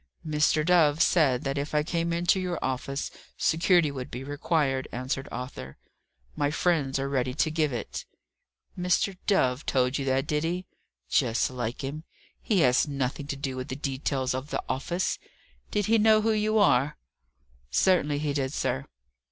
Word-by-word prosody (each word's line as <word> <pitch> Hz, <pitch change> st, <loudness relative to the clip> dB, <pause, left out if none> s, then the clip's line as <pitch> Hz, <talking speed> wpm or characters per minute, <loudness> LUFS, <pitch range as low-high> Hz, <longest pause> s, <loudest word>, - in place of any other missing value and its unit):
"Mr. 150 Hz, 0 st, +2 dB
Dove 160 Hz, -4 st, +4 dB
said 140 Hz, -9 st, +3 dB
that 140 Hz, 0 st, -1 dB
if 145 Hz, +2 st, -4 dB
I 150 Hz, -, +3 dB
came 170 Hz, +1 st, -1 dB
into 175 Hz, +2 st, +2 dB
your 180 Hz, -2 st, -2 dB
office 130 Hz, +2 st, -3 dB, 0.3 s
security 165 Hz, -1 st, +3 dB
would 130 Hz, -2 st, -6 dB
be 125 Hz, +2 st, -6 dB
required," 145 Hz, -1 st, 0 dB
answered 130 Hz, +2 st, -3 dB
Arthur. 120 Hz, -, -7 dB, 0.6 s
"My 145 Hz, -1 st, +1 dB
friends 150 Hz, -4 st, +1 dB
are 135 Hz, 0 st, -1 dB
ready 130 Hz, -2 st, -1 dB
to 155 Hz, +1 st, +1 dB
give 155 Hz, -2 st, +1 dB
it." 120 Hz, -, -5 dB, 0.7 s
"Mr. 180 Hz, +2 st, +1 dB
Dove 130 Hz, -9 st, +2 dB
told 130 Hz, +1 st, +1 dB
you 135 Hz, -, -2 dB
that, 135 Hz, +1 st, +1 dB
did 150 Hz, 0 st, 0 dB
he? 175 Hz, +3 st, -2 dB, 0.4 s
Just 120 Hz, -1 st, +1 dB
like 120 Hz, +1 st, -4 dB
him. 145 Hz, +4 st, -5 dB, 0.4 s
He 200 Hz, -6 st, +2 dB
has 125 Hz, +1 st, +4 dB
nothing 140 Hz, 0 st, -3 dB
to 145 Hz, -, -3 dB
do 135 Hz, -1 st, -4 dB
with 130 Hz, 0 st, -5 dB
the 130 Hz, -, -4 dB
details 135 Hz, -2 st, -2 dB
of 130 Hz, +3 st, -4 dB
the -, -, -2 dB
office. 175 Hz, +7 st, -1 dB, 0.5 s
Did 205 Hz, -1 st, 0 dB
he 225 Hz, +2 st, +3 dB
know 215 Hz, 0 st, +5 dB
who 225 Hz, +1 st, +2 dB
you 215 Hz, 0 st, +1 dB
are?" 145 Hz, -8 st, +3 dB, 0.7 s
"Certainly 150 Hz, -, +2 dB
he 145 Hz, -1 st, -1 dB
did, 135 Hz, -1 st, -1 dB
sir." 135 Hz, -1 st, -1 dB
145 Hz, 170 wpm, -27 LUFS, 130-170 Hz, 0.7 s, know